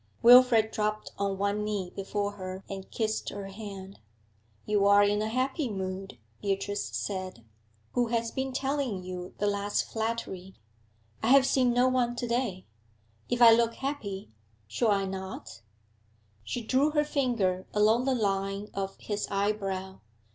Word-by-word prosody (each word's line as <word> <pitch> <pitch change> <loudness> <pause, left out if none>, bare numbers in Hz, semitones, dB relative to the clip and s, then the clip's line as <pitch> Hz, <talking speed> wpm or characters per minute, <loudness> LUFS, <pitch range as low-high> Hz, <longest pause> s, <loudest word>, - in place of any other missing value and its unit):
Wilfrid 240 -2 +7
dropped 215 0 -2
on 200 -1 -1
one 200 +1 0
knee 205 -4 -3
before 200 +1 -2
her 190 -1 -7
and 195 -1 -7
kissed 220 -1 -2
her 200 -1 -6
hand. 195 -1 -9 0.7
'You 205 -1 +2
are 200 0 +7
in 205 +1 +2
a 215 - -1
happy 260 +3 -1
mood,' 190 - -5 0.2
Beatrice 200 0 -1
said. 185 - -5 0.5
'Who 245 -1 +1
has 230 0 -1
been 265 0 -2
telling 265 -7 -2
you 180 0 -7
the 205 - -1
last 205 0 0
flattery?' 220 -4 -4 0.7
'I - - 0
have 270 +2 +7
seen 255 -2 +3
no 245 +1 +3
one 250 -2 +1
to 240 0 -3
day. 235 -6 -1 0.6
If 245 0 +3
I 230 - +10
look 230 0 +2
happy 215 - -4 0.4
should 220 - 0
I 200 -1 +2
not?' 190 -11 -7 0.8
She 235 - -4
drew 265 +6 +2
her 300 -1 +2
finger 235 -11 0
along 220 +4 +3
the 265 -1 +2
line 195 -2 -1
of 195 0 -4
his 205 -1 -3
eyebrow. 195 -2 -2
210 Hz, 150 wpm, -29 LUFS, 195-240 Hz, 0.8 s, I